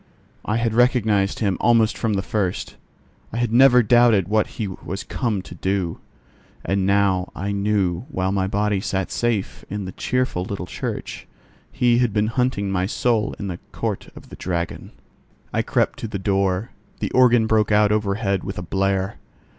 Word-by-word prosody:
I 105 Hz, -, -1 dB
had 115 Hz, -1 st, 0 dB
recognized 110 Hz, -5 st, +2 dB
him 100 Hz, -4 st, +1 dB
almost 115 Hz, -1 st, +4 dB
from 110 Hz, -2 st, -1 dB
the 95 Hz, -1 st, -1 dB
first; 95 Hz, -4 st, -2 dB, 0.6 s
I -, -, -4 dB
had 120 Hz, -2 st, 0 dB
never 125 Hz, 0 st, +7 dB
doubted 115 Hz, -5 st, +4 dB
what 110 Hz, +1 st, +2 dB
he 110 Hz, -4 st, -2 dB
was 95 Hz, +1 st, -6 dB
come 110 Hz, -7 st, -2 dB
to -, -, -10 dB
do; 95 Hz, -1 st, -2 dB, 0.7 s
and 95 Hz, -1 st, 0 dB
now 100 Hz, -2 st, +2 dB
I 100 Hz, +2 st, -3 dB
knew 100 Hz, 0 st, 0 dB
while 95 Hz, 0 st, -1 dB
my 95 Hz, -1 st, 0 dB
body 100 Hz, 0 st, 0 dB
sat 95 Hz, -3 st, -2 dB
safe 115 Hz, -5 st, -1 dB
in 100 Hz, -1 st, -4 dB
the 90 Hz, -, -5 dB
cheerful 125 Hz, -4 st, -1 dB
little 95 Hz, -1 st, -5 dB
church, -, -, -5 dB, 0.4 s
he 120 Hz, -1 st, +3 dB
had 120 Hz, -4 st, +1 dB
been 105 Hz, 0 st, +1 dB
hunting 125 Hz, -6 st, 0 dB
my 90 Hz, -1 st, 0 dB
soul 115 Hz, 0 st, 0 dB
in 100 Hz, -, -5 dB
the 90 Hz, -2 st, -5 dB
Court -, -, -3 dB
of -, -, -13 dB
the -, -, -9 dB
Dragon. 85 Hz, -1 st, -4 dB, 0.6 s
I -, -, +2 dB
crept -, -, 0 dB
to -, -, -4 dB
the 105 Hz, -, -4 dB
door: 95 Hz, +1 st, 0 dB, 0.3 s
the -, -, -2 dB
organ 120 Hz, -3 st, +5 dB
broke 110 Hz, -1 st, +2 dB
out 105 Hz, 0 st, +4 dB
overhead 100 Hz, -2 st, 0 dB
with 95 Hz, -, -5 dB
a 90 Hz, -, -4 dB
blare. 95 Hz, +1 st, -1 dB
100 Hz, 175 wpm, -22 LUFS, 95-115 Hz, 0.7 s, never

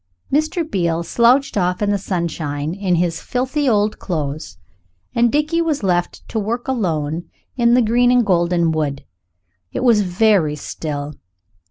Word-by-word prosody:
Mr. 310 Hz, +3 st, +1 dB
Beale 170 Hz, -, 0 dB
slouched 240 Hz, +10 st, +3 dB
off 180 Hz, -2 st, 0 dB
in 205 Hz, -1 st, +1 dB
the 205 Hz, -, +2 dB
sunshine 160 Hz, -5 st, -3 dB
in 190 Hz, -2 st, 0 dB
his 170 Hz, -1 st, 0 dB
filthy 260 Hz, +3 st, -1 dB
old 210 Hz, -1 st, +1 dB
clothes, 155 Hz, -3 st, -4 dB, 0.6 s
and 235 Hz, 0 st, +3 dB
Dickie 305 Hz, +3 st, +1 dB
was 315 Hz, -8 st, -1 dB
left 175 Hz, -2 st, -1 dB
to 220 Hz, -, -2 dB
work 230 Hz, +4 st, -3 dB
alone 170 Hz, -, -2 dB, 0.3 s
in 235 Hz, -1 st, +4 dB
the 250 Hz, -, +4 dB
green 240 Hz, +3 st, +3 dB
and 245 Hz, -1 st, +4 dB
golden 175 Hz, -2 st, +2 dB
wood. 145 Hz, -3 st, -2 dB, 0.7 s
It -, -, -3 dB
was 230 Hz, -4 st, +5 dB
very 180 Hz, -4 st, +2 dB
still. 145 Hz, 0 st, -5 dB
195 Hz, 150 wpm, -19 LUFS, 165-240 Hz, 0.7 s, was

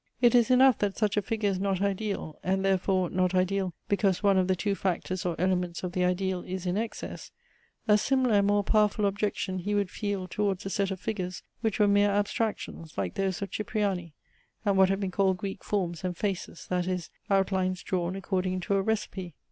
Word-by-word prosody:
It 240 Hz, -2 st, +5 dB
is 240 Hz, -2 st, +5 dB
enough 255 Hz, -1 st, +6 dB
that 200 Hz, -1 st, -1 dB
such 210 Hz, -2 st, +1 dB
a 210 Hz, -, +2 dB
figure 210 Hz, 0 st, 0 dB
is 185 Hz, -, -2 dB
not 195 Hz, -1 st, 0 dB
ideal: 200 Hz, -5 st, -2 dB
and 190 Hz, +1 st, 0 dB
therefore 185 Hz, -1 st, +1 dB
not 185 Hz, 0 st, +1 dB
ideal, 185 Hz, -1 st, +1 dB
because 200 Hz, -2 st, +1 dB
one 200 Hz, -1 st, +5 dB
of 185 Hz, -1 st, +3 dB
the 190 Hz, -, +2 dB
two 200 Hz, +3 st, 0 dB
factors 185 Hz, -1 st, -2 dB
or 170 Hz, -, -1 dB
elements 180 Hz, -1 st, 0 dB
of 180 Hz, -, -2 dB
the 180 Hz, 0 st, 0 dB
ideal 180 Hz, 0 st, 0 dB
is 185 Hz, 0 st, -5 dB
in 180 Hz, 0 st, 0 dB
excess. 225 Hz, +2 st, -4 dB, 0.6 s
A 210 Hz, -1 st, +5 dB
similar 255 Hz, -1 st, +2 dB
and 200 Hz, 0 st, +3 dB
more 205 Hz, 0 st, +3 dB
powerful 210 Hz, 0 st, +2 dB
objection 200 Hz, -2 st, -1 dB
he 205 Hz, +3 st, -1 dB
would 200 Hz, -2 st, 0 dB
feel 200 Hz, -3 st, -3 dB
towards 200 Hz, 0 st, -1 dB
a 195 Hz, -, -3 dB
set 195 Hz, +1 st, 0 dB
of 190 Hz, -2 st, -4 dB
figures 185 Hz, -4 st, -4 dB, 0.2 s
which 220 Hz, -3 st, -1 dB
were 210 Hz, -, +5 dB
mere 205 Hz, 0 st, +4 dB
abstractions, 205 Hz, -5 st, -2 dB
like 95 Hz, -3 st, -1 dB
those 195 Hz, 0 st, -1 dB
of 200 Hz, -, -6 dB
Cipriani, 195 Hz, -6 st, -2 dB, 0.5 s
and 200 Hz, -1 st, +3 dB
what 190 Hz, -1 st, +5 dB
have 195 Hz, 0 st, +1 dB
been 190 Hz, -2 st, -2 dB
called 190 Hz, 0 st, +2 dB
Greek 195 Hz, +1 st, -5 dB
forms 180 Hz, -5 st, -2 dB
and 180 Hz, -2 st, -2 dB
faces, 195 Hz, -4 st, -3 dB
that 180 Hz, 0 st, 0 dB
is, 180 Hz, -2 st, -3 dB, 0.2 s
outlines 190 Hz, -2 st, +1 dB
drawn 180 Hz, 0 st, -1 dB
according 185 Hz, -1 st, -1 dB
to 200 Hz, -, -1 dB
a 195 Hz, -, +3 dB
recipe. 190 Hz, -4 st, -3 dB
195 Hz, 205 wpm, -28 LUFS, 185-205 Hz, 0.6 s, enough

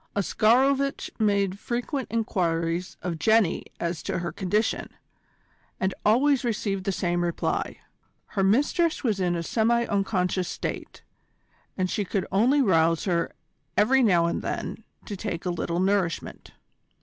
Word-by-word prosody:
Oscarovitch 265 Hz, +7 st, +2 dB
made 200 Hz, -2 st, +1 dB
frequent 245 Hz, +4 st, -3 dB
enquiries 175 Hz, -5 st, -1 dB
of 170 Hz, -3 st, -3 dB
Jenny 220 Hz, -4 st, +3 dB
as 170 Hz, -1 st, -2 dB
to -, -, -3 dB
her 170 Hz, -1 st, -3 dB
condition, 200 Hz, +5 st, -1 dB, 0.9 s
and 190 Hz, 0 st, 0 dB
always 265 Hz, +6 st, +3 dB
received 200 Hz, -5 st, -2 dB
the 195 Hz, -, +1 dB
same 175 Hz, -2 st, 0 dB
reply. 170 Hz, -1 st, -2 dB, 0.5 s
Her 195 Hz, -, -1 dB
mistress 290 Hz, -, +2 dB
was 215 Hz, -6 st, 0 dB
in 175 Hz, -2 st, +1 dB
a 170 Hz, -, -2 dB
semi 235 Hz, +5 st, +2 dB
unconscious 190 Hz, -3 st, 0 dB
state, -, -, -5 dB, 0.7 s
and 185 Hz, -1 st, +1 dB
she 205 Hz, -, -1 dB
could 195 Hz, -1 st, -2 dB
only 250 Hz, +9 st, +4 dB
rouse 165 Hz, -5 st, +3 dB
her 170 Hz, -3 st, 0 dB, 0.4 s
every 260 Hz, +6 st, +4 dB
now 180 Hz, -8 st, +4 dB
and 170 Hz, -, -1 dB
then -, -, -4 dB, 0.2 s
to 205 Hz, -, -5 dB
take 190 Hz, -3 st, -4 dB
a 180 Hz, -, 0 dB
little 170 Hz, 0 st, -2 dB
nourishment. 190 Hz, -3 st, -1 dB
195 Hz, 135 wpm, -26 LUFS, 175-225 Hz, 0.9 s, only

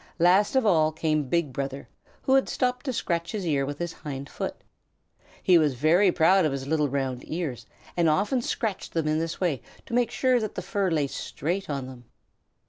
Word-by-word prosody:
Last 185 Hz, +6 st, +4 dB
of 260 Hz, -3 st, +3 dB
all 160 Hz, -6 st, +4 dB
came 155 Hz, -3 st, -1 dB
Big 160 Hz, -3 st, 0 dB
Brother, 135 Hz, +1 st, -4 dB, 0.4 s
who 265 Hz, -, +2 dB
had 270 Hz, 0 st, +4 dB
stopped 250 Hz, +1 st, -1 dB
to -, -, +1 dB
scratch 170 Hz, -7 st, -2 dB
his 205 Hz, -4 st, -3 dB
ear 140 Hz, -4 st, +1 dB
with 145 Hz, 0 st, -4 dB
his 175 Hz, 0 st, -4 dB
hind 140 Hz, -2 st, -7 dB
foot. -, -, -4 dB, 0.9 s
He 180 Hz, -2 st, +6 dB
was 150 Hz, -4 st, +2 dB
very 170 Hz, +9 st, +4 dB
proud 180 Hz, +3 st, +4 dB
of 155 Hz, -, +1 dB
his 135 Hz, -1 st, -4 dB
little 150 Hz, 0 st, +1 dB
round 130 Hz, -2 st, -2 dB
ears, 155 Hz, -7 st, -4 dB, 0.3 s
and 170 Hz, -2 st, +3 dB
often 205 Hz, -, +1 dB
scratched 220 Hz, -4 st, -3 dB
them 160 Hz, -2 st, +1 dB
in 155 Hz, +1 st, +1 dB
this 165 Hz, 0 st, -3 dB
way 160 Hz, -, 0 dB, 0.2 s
to 240 Hz, -, -9 dB
make 245 Hz, 0 st, +2 dB
sure 255 Hz, -2 st, +2 dB
that 215 Hz, -2 st, -4 dB
the -, -, -4 dB
fur 200 Hz, -3 st, 0 dB
lay 155 Hz, -4 st, +1 dB
straight 170 Hz, +7 st, -4 dB
on 140 Hz, -3 st, -2 dB
them. 130 Hz, -2 st, -11 dB
165 Hz, 205 wpm, -26 LUFS, 145-195 Hz, 0.9 s, He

